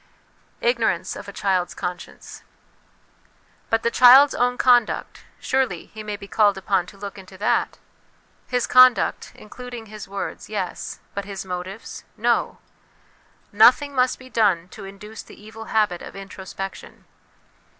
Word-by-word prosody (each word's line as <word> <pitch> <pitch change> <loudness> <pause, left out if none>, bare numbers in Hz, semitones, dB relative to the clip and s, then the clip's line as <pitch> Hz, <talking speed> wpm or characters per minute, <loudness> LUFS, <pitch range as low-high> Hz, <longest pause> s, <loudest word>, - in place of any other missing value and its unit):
Ignorance 485 0 0
of - - -9
a - - -6
Child's 190 -4 -1
Conscience. 180 0 -7 1.3
But 225 0 +1
the 235 - +1
child's 260 +4 +8
own 245 0 0
conduct: 245 -3 +2
surely 255 -10 -1
he 215 - -7
may 210 -1 -5
be 200 - -11
called 205 -1 +3
upon 190 -2 0
to 200 - -14
look 200 0 -8
into 190 0 -13
that? 205 - 0 0.7
His 250 -1 0
conduct, 255 -1 +4
including 245 +1 -10
his 215 -1 -10
words, 195 0 -6
yes; 200 -4 -5
but 200 -1 -4
his 195 -1 -6
motives, 185 +3 -7
no; - - 0 0.9
nothing 250 +7 +5
must 255 -1 +1
be 255 - -14
done 200 -7 +1
to 195 - -10
induce 210 +3 -10
the - - -15
evil 220 +1 -11
habit 210 -6 0
of - - -10
introspection. 195 0 -8
210 Hz, 140 wpm, -23 LUFS, 195-245 Hz, 1.3 s, child's